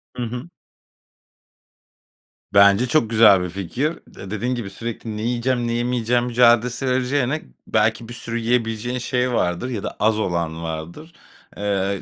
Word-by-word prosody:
Hı 125 - -3
hı. 125 +7 -5 2.0
Bence 100 +4 +6
çok 120 -5 +2
güzel 110 -4 +6
bir 90 - -3
fikir. 110 - -2
De 95 +1 -11
dediğin 120 +4 -1
gibi 110 -5 -5
sürekli 110 +1 -6
"Ne - - -4
yiyeceğim, 120 +1 0
ne 115 - -1
yemeyeceğim?" 120 0 0
mücadelesi 125 +1 +3
vereceğine, 130 +3 0 0.3
belki 110 +2 +1
bir - - -7
sürü 115 -1 -4
yiyebileceğin 115 +1 -1
şey 125 +1 -1
vardır 90 +5 0
ya 110 -6 -4
da - - -5
az 110 0 +2
olan 85 -4 -2
vardır. 85 - -7 0.4
Eee, 100 -1 -1
115 Hz, 145 wpm, -22 LUFS, 100-125 Hz, 2.0 s, Bence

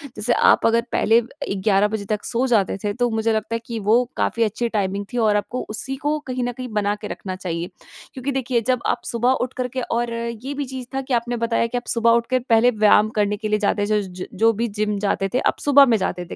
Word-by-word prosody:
जैसे 215 +3 0
आप - - +4
अगर 230 +1 +3
पहले 225 +2 +3
ए, 240 -1 -3
11 195 +1 +2
बजे 210 -1 -4
तक 210 0 -2
सो 245 +2 0
जाते 205 -6 +2
थे 205 - -1
तो 245 +2 0
मुझे 220 0 0
लगता 220 +1 -2
है 230 - -1
कि 230 -1 -4
वो 220 +4 +3
काफ़ी 230 - +1
अच्छी 230 +2 -1
टाइमिंग 200 -2 -2
थी। - - -2
और 215 -3 +3
आपको 240 +5 -3
उसी 265 +5 -4
को 295 +3 -1
कहीं 255 -1 -2
न 245 - -1
कहीं 255 +1 -7
बना 205 0 0
के - - -8
रखना 185 -2 -6
चाहिए। 175 -2 -4 0.4
क्योंकि 270 +1 -3
देखिए 255 -3 0
जब 255 -2 +1
आप 240 - 0
सुबह 240 +2 +1
उठ 250 +1 -2
करके 255 0 -3
और 235 0 -2
ये 235 +3 -4
भी 285 0 -3
चीज़ 260 -1 -7
था 270 - 0
कि 265 -1 -4
आपने 240 0 0
बताया 230 0 0
कि 245 - -3
आप 245 - -6
सुबह 230 0 +2
उठकर 235 +2 +2
पहले 230 +2 +5
व्यायाम 215 0 +4
करने 205 0 +1
के 215 - -4
लिए 210 0 +1
जाते 205 0 +1
थे। 210 0 +1
ज 190 - -7
ज - - -8
जो 225 +1 +3
भी 230 +3 -1
जिम 210 -1 -2
जाते 195 -1 0
थे, 255 - +2
आप - - 0
सुबह 285 -1 +6
में 235 -3 +3
जाते 180 -2 -3
थे - - -8
230 Hz, 255 wpm, -22 LUFS, 210-245 Hz, 0.4 s, सुबह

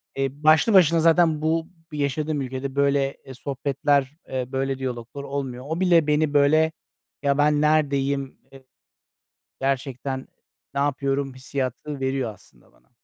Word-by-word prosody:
Eee, 135 0 0
başlı 155 +8 +5
başına 170 -3 +6
zaten 165 -1 +4
bu 160 +1 0 0.2
yaşadığım, 150 +1 -1
ülkede, 130 +1 -5
böyle, 140 0 +1
eee, 130 - -9
sohbetler, 140 +1 -1
eee, 130 -1 -2
böyle, 135 0 -1
diyaloglar 130 +1 -5
olmuyor. 135 -2 -5
O 160 +2 -3
bile 170 -4 +4
beni, 150 0 +2
böyle, 155 +3 +4 0.5
"Ya, 140 -1 +1
ben 150 0 +3
neredeyim, 140 -3 +1
ııı, 135 - -14 1.0
gerçekten 135 0 -2 0.5
ne 140 - 0
yapıyorum?" 140 -1 -1
hissiyatı 130 +2 -4
veriyor 130 -4 -1
aslında 80 -10 -23
bana. - - -31
140 Hz, 135 wpm, -24 LUFS, 130-150 Hz, 1.0 s, başına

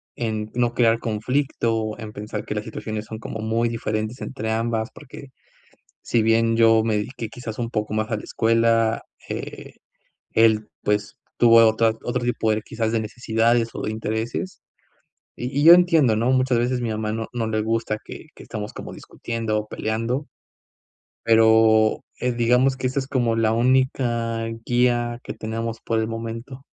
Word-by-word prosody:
en 110 -2 -3
no 120 -1 0
crear 115 -2 +3
conflicto, 115 -1 -1
en 110 -2 -8
pensar 105 0 -6
que - - -3
las 105 - -2
situaciones 110 -1 -5
son 110 - -7
como 110 - -7
muy 115 +2 0
diferentes 110 0 -3
entre 110 -4 -4
ambas, 115 0 -1
porque 130 +1 -12 0.7
si 115 - +1
bien 115 +1 +3
yo 115 -1 +5
me 110 -1 +1
dedique 115 +1 -5
quizás 115 -2 -8
un 115 -1 -2
poco 105 -2 -2
más 110 +1 -1
a 110 - 0
la - - -8
escuela, 115 0 +2 0.3
eh, - - -7 0.6
él 110 -1 +3
pues, 105 0 -1 0.2
tuvo 115 -1 +6
otra 110 +1 +3
otro 120 0 -2
tipo 120 -2 0
de 110 0 0
quizás 115 0 -3
de 115 - +1
necesidades 115 +1 +1
o - - -5
de - - -2
intereses, 110 - -4 0.8
y 125 +3 -3
y - - +2
yo 170 +2 +10
entiendo, 165 -10 +4
¿no? 120 +3 +1
Muchas 130 -1 +2
veces, 125 +1 0
mi 120 - -2
mamá 110 0 -2
no 110 0 -3
no 115 -2 -1
le 110 -1 0
gusta 110 0 -1
que - - -10
que - - -12
estamos 105 -1 -6
como - - -8
discutiendo 115 -2 -4
o 105 - -7
peleando, 115 +7 -2 1.0
pero, 110 -1 +4 0.2
eh, 125 0 0
digamos 125 +3 +2
que 130 -1 -3
esta 130 +2 -1
es 130 - -6
como 120 -4 0
la 110 -1 +2
única 120 -2 +1 0.2
guía 120 -1 +1
que - - -6
tenemos 115 +1 -4
por 115 -1 -1
el 110 - 0
momento. 115 +3 -6
115 Hz, 175 wpm, -23 LUFS, 110-120 Hz, 1.0 s, yo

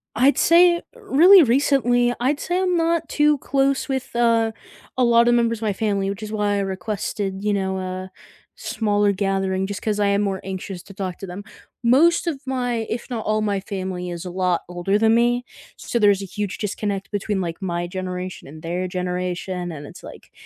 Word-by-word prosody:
I'd 260 +5 +4
say 345 0 +5
Really 385 - +6
recently, 245 -2 +2
I'd 275 +4 0
say 355 +1 -1
I'm 365 -1 +1
not 335 0 +1
too 300 0 +3
close 275 +1 0
with, 265 -3 -4
uh, 230 -1 +3 0.5
a 255 - +3
lot 235 0 +5
of 240 - +5
members 230 -1 +1
of - - -19
my 215 -2 0
family, 200 -1 -1
which 200 +2 -5
is 215 - -6
why 210 -1 0
I - - 0
requested, 195 0 -3
you 210 0 +1
know, 190 -1 -1
a 185 0 -5 0.5
smaller 205 -2 0
gathering 195 -1 -1
just 205 0 -5
'cause 210 -1 -1
I 205 - +3
am 200 +1 +2
more 195 -2 -2
anxious 190 -1 -6
to 200 - -13
talk 185 -3 -4
to 195 - -7
them. 180 +3 -7 0.4
Most 290 +9 +4
of 305 -6 -3
my, 245 -3 -1
if 235 +3 -4
not 225 -3 -3
all 215 0 +1
my 205 -2 0
family, 185 -2 -5
is 175 0 -6
a 180 - -5
lot 180 -1 0
older 180 +3 0
than 220 +1 +3
me, 240 +1 +2 0.3
so 235 - -2
there's 205 -2 +4
a - - -4
huge 205 +1 -4
disconnect 200 -1 -3
between, 205 -1 -2
like, 170 0 -4
my 175 -2 -2
generation 185 -1 -5
and 155 +3 -12
their 175 +2 -2
generation 180 0 -3
and 145 -2 -8
it's - - -12
like, - - -12
205 Hz, 200 wpm, -22 LUFS, 190-240 Hz, 0.5 s, Really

